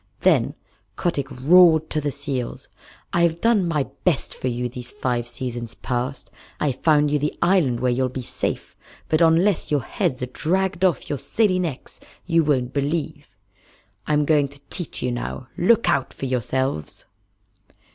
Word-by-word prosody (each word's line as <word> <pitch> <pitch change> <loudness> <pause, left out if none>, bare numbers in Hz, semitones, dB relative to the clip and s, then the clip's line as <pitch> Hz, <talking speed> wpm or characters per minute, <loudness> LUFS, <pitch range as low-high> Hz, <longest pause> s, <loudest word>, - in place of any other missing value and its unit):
Then - - +3 0.4
Kotick 150 -7 -1
roared 160 +4 +5
to 155 - 0
the 145 - -1
seals: 140 -3 -4 0.5
"I've 170 -1 +2
done 220 -5 +3
my 155 -4 +1 0.2
best 170 -7 +1
for - - -4
you 125 0 -1
these 125 0 -8
five 125 - -2
seasons 120 -1 -5
past. 125 +1 -4 0.3
I've 140 -4 0
found 150 -2 +4
you 150 - +2
the 150 +2 -2
island 170 -10 +2
where 125 0 +1
you'll 130 +1 +1
be 130 0 -5
safe, - - -4 0.3
but 155 - +2
unless 170 +3 +3
your 145 -5 +1
heads 125 +2 -2
are 125 0 -6
dragged 190 +2 0
off 175 -8 +2
your 145 - -3
silly 205 -5 +1
necks 160 -7 -5 0.3
you 165 -2 +3
won't 130 -4 0
believe. 145 +3 -2 0.8
I'm 150 -1 +2
going 145 -2 +3
to 140 +1 -15
teach 175 -5 -3
you 125 - 0
now. 120 +1 -5
Look 230 +6 +3
out 135 -2 +1
for - - -5
yourselves!" 130 - -2
145 Hz, 160 wpm, -23 LUFS, 125-170 Hz, 0.8 s, roared